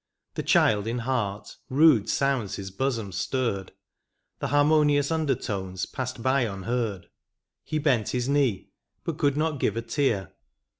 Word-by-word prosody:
The - - -3
child 105 -1 +3
in 115 +2 -1
heart, 115 -5 -3
rude 135 -6 +5
sounds 135 -8 0
his 95 -1 -7
hosom 115 -5 -1
stirred, 100 -1 -2 0.7
The - - -2
harmonious 145 0 +3
under 155 -4 +1
tones 95 -4 -4
passed 130 -2 -5
by 130 +1 +3
unheard, 110 -1 -2 0.6
He 155 - -3
bent 135 -8 +1
his 125 0 -1
knee, 135 -9 +1 0.3
but 165 -1 -4
could 145 -2 +2
not 155 -2 0
give 110 -2 0
a 115 - -2
tear. 115 - -1
125 Hz, 145 wpm, -26 LUFS, 105-145 Hz, 0.7 s, rude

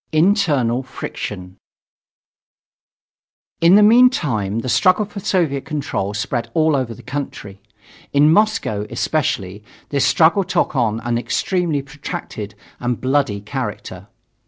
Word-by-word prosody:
INTERNAL 155 - +2
FRICTION 95 -7 -7 2.0
In 170 +3 +6
the 210 - +7
meantime, 170 - +3
the 130 - -6
struggle 185 - +3
for 205 0 -8
Soviet 170 -9 0
control 140 -9 -3
spread 115 +2 -3
all 160 -1 +3
over 125 -4 -2
the 120 - -14
country. 120 -6 -6 0.5
In 150 +2 +5
Moscow, 205 - +1
especially, 105 -6 -2 0.3
this 140 -2 +1
struggle 165 +6 +4
took 175 - -1
on 115 -3 0
an 120 0 -1
extremely 165 +1 -1
protracted 125 -6 -7 0.2
and 120 -1 -2
bloody 130 -6 0
character. 105 - -6
135 Hz, 115 wpm, -19 LUFS, 115-165 Hz, 2.0 s, the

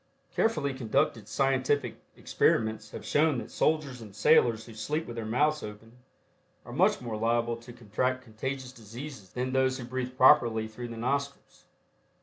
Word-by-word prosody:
Carefully 155 -11 +1
conducted 115 -3 0
scientific 135 +3 +1 0.2
experiments 110 -1 +1
have - - -9
shown 150 -2 +3
that - - -6
soldiers 145 -6 0
and 105 -3 -11
sailors 115 -5 +4
who 115 - -11
sleep 150 +9 -2
with 120 - -7
their 115 -2 -4
mouths 150 +7 +2
open 110 +3 -10 0.7
are - - -9
much - - +3
more 115 -3 -4
liable 115 +1 +1
to 120 +1 -12
contract 125 +3 -2
contagious 130 +3 -5
diseases 120 -1 -9
than 130 +1 -2
those 130 0 +2
who 125 - -6
breathe 130 0 -4
properly 115 -4 +5
through 120 +2 -7
the 115 -1 -8
nostrils. 140 +4 -3
125 Hz, 155 wpm, -29 LUFS, 115-135 Hz, 0.7 s, properly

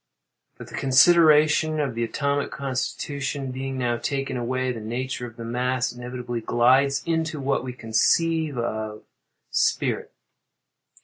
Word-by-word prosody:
But - - -10
the - - -14
consideration 155 +2 +5
of 140 -4 -1
the 115 +1 -2
atomic 140 +5 -1
constitution 135 0 -3
being 135 +1 -4
now 120 -2 0
taken 135 +2 -3
away, 130 +1 -1
the 120 - -5
nature 125 +3 -4
of 115 - -13
the 115 -1 -8
mass 125 +1 -1
inevitably 125 -1 -5
glides 130 +5 +3
into 160 -2 -1
what 135 -1 0
we 130 - -4
conceive 150 +6 +1
of 110 -2 -3 0.5
spirit. - - 0
130 Hz, 130 wpm, -24 LUFS, 120-140 Hz, 0.5 s, consideration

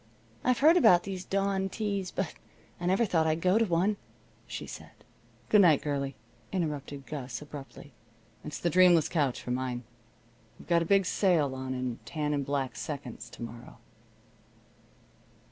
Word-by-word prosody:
I've 250 -1 +3
heard 315 +6 +6
about 175 - +6
these 190 -2 -5
dawn 195 0 0
teas, 200 -2 -2
but 190 -2 -3 0.5
I 175 - -2
never 195 +6 +3
thought 165 -5 +2
I'd 160 +1 +1
go 185 +5 +4
to 230 - +3
one," 190 +3 +1 0.5
she - - -6
said. - - -9 0.6
"Good 210 - +7
night, 160 -7 +5
girlie," 140 -2 -2 0.4
interrupted 145 -6 -3
Gus, 130 -5 -5
abruptly. 145 -1 -10 0.5
"It's 150 - -5
the 170 - -1
dreamless 175 -3 +6
couch 145 -7 0
for 125 - -4
mine. 125 -1 -2 0.7
We've - - -15
got 170 -1 +3
a - - 0
big 195 +2 +4
sale 165 -7 +2
on 130 0 -4
in 125 -2 -3
tan 150 -2 -2
and 140 -1 0
black 135 -1 -2
seconds 125 -5 -6
to 120 - -9
morrow." 115 +1 -9
160 Hz, 160 wpm, -29 LUFS, 140-190 Hz, 0.7 s, Good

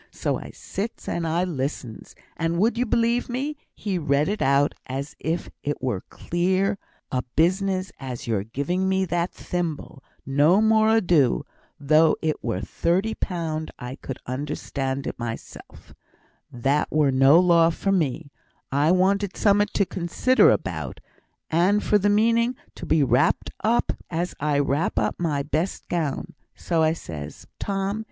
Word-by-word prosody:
So - - -2
I - - -9
sits 215 +4 -6
and 170 -1 -1
I 165 +3 +1
listens. 135 -8 -4 0.2
And 165 +1 -1
would 220 +5 +2
you 245 +1 0
belie' 235 +2 +2
me, 275 +5 -2 0.2
he 195 -4 -2
read 145 -1 +1
it 210 +1 -2
out 140 +1 +3
as 135 +2 -5
if 165 +2 -3
it 145 0 -3
were 125 -6 -1
as - - -16
clear 190 +3 +1 0.3
a 125 - 0
business 185 +3 +1
as 130 -3 -6
your 110 -4 0
giving 160 - -1
me 190 0 +2
that 175 0 -1
thimble 160 -5 -4 0.2
no 145 +8 +4
more 220 0 +4
ado, 175 - +3 0.3
though 155 +2 +4
it 155 -1 -2
were - - -2
thirty 190 +6 0
pound! 160 -6 -3
I 125 0 -6
could 135 -2 -7
understand 135 0 -3
it - - -5
mysel' 115 -1 -7 0.7
that 135 +5 +1
were 150 -3 +3
no 135 +5 +6
law 170 -2 +5
for 195 +4 -1
me. 155 -5 -1 0.4
I 145 +3 +2
wanted 195 +2 +2
summat 205 0 +3
to 200 - +3
consider 185 +9 +3
about, - - -2 0.5
and 185 +6 +3
for 210 - +3
th' 205 +1 +2
meaning 230 +4 +3 0.2
to - - -8
be 160 -2 +3
wrapped 125 +1 +2
up 230 +3 +2 0.2
as 175 +1 -2
I 150 0 +1
wrap 145 +2 0
up 105 -1 0
my 150 -5 0
best 155 +6 -2
gown. 160 -6 -2 0.2
So 160 -2 +1
says 75 - -8
I, - - -40
'Tom! 195 +1 -2
165 Hz, 155 wpm, -24 LUFS, 140-195 Hz, 0.7 s, no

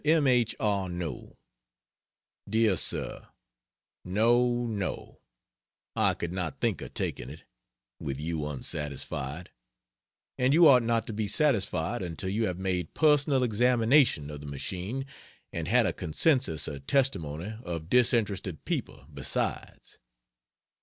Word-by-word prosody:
M. 155 0 +3
H. 125 -3 +3
ARNOT 90 - -3 1.1
DEAR 110 -2 +3
SIR, - - -3 0.8
No 120 +5 +2
no, 105 -5 -4 0.7
I - - +3
could 85 - -4
not 90 -5 -4
think - - 0
of - - -9
taking - - -3
it, 75 +4 -11 0.6
with 70 -1 -4
you 80 -1 -3
unsatisfied; 75 +2 -4 0.9
and 130 +3 +3
you 170 0 +8
ought 130 -4 +7
not 115 -1 0
to 110 - -5
be 105 0 -2
satisfied 100 - +1
until 85 0 -4
you 110 +3 0
have 90 - -3
made 90 -3 -2
personal 145 -3 +3
examination 120 - +3
of 75 - -7
the 75 - -9
machine 95 - -4 0.5
and - - -3
had - - +4
a - - 0
consensus 105 - +1
of 70 -2 -7
testimony 100 - 0
of 85 -2 -5
disinterested 105 - +1
people, - - -4
besides. 70 -3 -4
100 Hz, 125 wpm, -28 LUFS, 80-120 Hz, 1.1 s, you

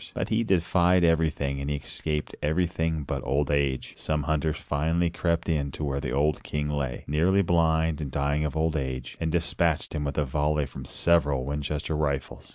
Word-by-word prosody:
But - - -2
he 115 +1 +2
defied 90 -2 +3
everything 80 -4 +1
and 70 - -3
he 75 - 0
escaped 75 +1 -3
everything 80 0 0
but - - -3
old 70 +1 0
age. 70 -2 0
Some 75 -1 -1
hunters 80 +1 0
finally 80 +4 0
crept 85 0 0
in 75 -4 0
to - - -5
where 70 -1 -1
the - - -3
old 75 +3 +1
king 75 0 -3
lay, 70 -4 -2
nearly 90 +7 +3
blind 80 -2 +2
and 75 - -3
dying 70 +3 0
of 75 0 -2
old 80 0 +1
age, 65 -3 -3
and 80 -1 0
dispatched 85 -1 0
him 75 -2 -2
with 70 -2 -3
a 75 - +2
volley 75 +2 0
from 65 -1 -9
several 75 -4 +2
Winchester 75 +2 -2
rifles. 70 -3 -2
75 Hz, 185 wpm, -27 LUFS, 70-80 Hz, -, defied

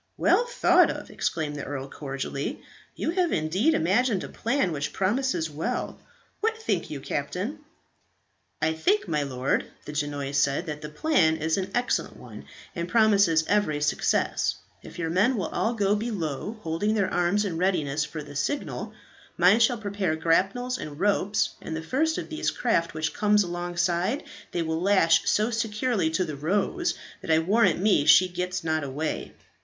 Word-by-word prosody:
"Well 485 - +3
thought - - +4
of!" - - -6
exclaimed 150 -2 -2
the 140 - -5
earl, 135 -1 -5
cordially. 140 0 -5 0.3
"You - - -1
have 355 -1 +1
indeed 185 - +1
imagined 195 +5 +2
a - - -7
plan 240 -4 0
which 145 -1 -3
promises 195 -3 0
well. 160 +12 -3 0.4
What 445 +1 0
think 200 - -2
you, 145 - -5
captain?" 180 - -3 1.0
"I 160 +1 +2
think, 400 - +1
my 150 -2 0
lord," 130 -2 -1 0.2
the 150 - -7
Genoese 145 -1 -1
said, 140 +4 +1
"that 150 -2 -5
the 150 - -6
plan 160 - +2
is 160 +1 0
an 190 -1 -2
excellent 245 +1 -1
one, - - -11 0.3
and 170 -1 -3
promises 200 -7 +4
every 205 -8 +1
success. 150 0 +1 0.3
If - - -12
your 165 -1 -2
men 225 +9 +3
will 185 - -2
all 230 +2 -1
go 205 -1 +2
below, 205 - -3
holding 170 +7 0
their 195 -3 0
arms 185 +4 +2
in 165 -4 -3
readiness 155 -6 +1
for 150 0 -6
the 145 - -11
signal, 280 - -3 0.4
mine 185 +6 +5
shall 235 +1 +3
prepare 200 -6 -2
grapnels 195 +11 +1
and 150 0 -7
ropes, 200 +1 +1
and 160 - -5
the 160 - -4
first 315 - 0
of - - -4
these 315 -1 -1
craft 170 -10 0
which 155 -1 -2
comes 210 -1 +3
alongside 175 - -1 0.3
they 170 - -1
will 160 0 -2
lash 180 -4 +4
so 215 +3 +2
securely 225 -4 0
to 165 +3 0
the 155 -3 -5
"Rose" 200 - 0 0.3
that - - -9
I 160 - +5
warrant 200 +8 +3
me 195 -7 +3
she 150 +5 +7
gets 180 0 -3
not 155 -1 0
away." 145 +3 -4
180 Hz, 170 wpm, -26 LUFS, 155-215 Hz, 1.0 s, she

